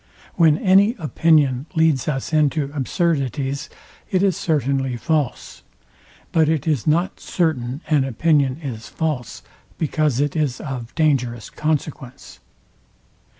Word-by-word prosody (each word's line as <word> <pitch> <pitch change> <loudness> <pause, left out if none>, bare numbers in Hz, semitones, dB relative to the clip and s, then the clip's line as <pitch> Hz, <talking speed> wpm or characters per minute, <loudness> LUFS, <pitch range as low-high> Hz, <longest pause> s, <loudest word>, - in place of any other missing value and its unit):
When 160 -3 +4
any 200 +6 +4
opinion 150 -5 +2
leads 160 -5 +2
us 140 +1 -3
into 150 -2 +1
absurdities, 140 - -1 0.4
it 185 0 +1
is 195 -4 +2
certainly 135 -6 0
false; 150 +1 -2 0.7
but 160 -2 +3
it 155 -4 0
is 150 -6 0
not 170 +5 +1
certain 145 -6 -1
an 150 -3 +3
opinion 135 +1 +1
is 120 -5 -6
false, 145 -9 -4 0.3
because 155 -4 0
it 145 0 0
is 145 -5 -1
of 125 -5 -6
dangerous 125 -7 0
consequence. 150 -4 -4
150 Hz, 115 wpm, -21 LUFS, 130-160 Hz, 0.7 s, When